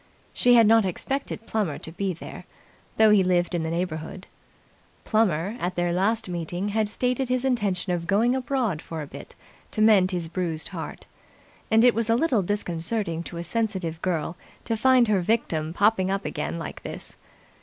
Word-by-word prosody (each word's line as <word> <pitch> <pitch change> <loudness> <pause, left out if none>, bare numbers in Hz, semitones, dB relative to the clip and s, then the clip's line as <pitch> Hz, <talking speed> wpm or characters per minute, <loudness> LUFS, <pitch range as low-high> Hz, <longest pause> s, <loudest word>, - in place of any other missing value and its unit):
She 245 0 +4
had 230 -1 +7
not 225 +1 +5
expected 225 +5 -3
Plummer 205 -10 -1
to 160 - -8
be 195 +3 -2
there, 170 - -9 0.5
though 220 -1 +6
he 205 -2 +5
lived 180 -1 +1
in 175 - 0
the 160 - -2
neighbourhood. 170 +1 -4 0.8
Plummer, 205 -3 +1
at 180 -2 -2
their 175 0 0
last 220 +5 +1
meeting, 175 +2 -3
had 215 0 0
stated 250 +3 0
his 255 +1 0
intention 200 -8 0
of 170 -1 -3
going 220 +5 +3
abroad 250 - -1
for 160 -2 -6
a - - -6
bit - - -11 0.3
to - - -6
mend 210 -4 +5
his 175 -3 -3
bruised 165 -2 -2
heart: - - -7 0.6
and 225 +1 +5
it 245 -1 +6
was 230 0 -1
a 230 - +4
little 250 -5 +2
disconcerting 175 -1 -2
to 170 0 -8
a 170 - -4
sensitive 185 -4 -2
girl 170 -2 -1 0.3
to 230 - 0
find 255 +1 +4
her 205 -3 +2
victim 170 -6 0
popping 195 0 +2
up 195 +1 -2
again - - -3
like 165 - -7
this. - - -8
195 Hz, 180 wpm, -25 LUFS, 175-225 Hz, 0.8 s, had